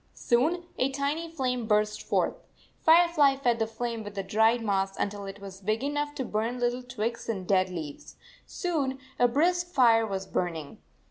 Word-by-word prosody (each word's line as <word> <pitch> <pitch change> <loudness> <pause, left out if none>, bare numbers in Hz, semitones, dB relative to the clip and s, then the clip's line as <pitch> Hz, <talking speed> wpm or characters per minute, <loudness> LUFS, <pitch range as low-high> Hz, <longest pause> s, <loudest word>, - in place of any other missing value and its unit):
Soon 315 +9 +1
a 260 - +2
tiny 285 +5 -2
flame 250 -7 -2
burst 210 0 +1
forth. - - 0 0.5
Firefly 320 -4 +5
fed 245 -4 +1
the 225 - +1
flame 230 0 -4
with 205 -1 -9
the 195 - -2
dried 220 +4 +2
moss 195 -2 0
until 200 0 -3
it 195 +1 -8
was 195 -1 -10
big 215 +5 -1
enough 290 +1 -2
to 260 - -3
burn 225 +3 -2
little 245 +1 0
twigs 235 -2 -4
and 190 -5 -3
dead 185 -1 +3
leaves. 160 -5 -7 0.3
Soon 290 -7 -2 0.2
a 245 - +6
brisk 350 +8 +2
fire 235 -9 +4
was 195 -2 -3
burning. 165 -6 -3
235 Hz, 175 wpm, -28 LUFS, 205-275 Hz, 0.5 s, a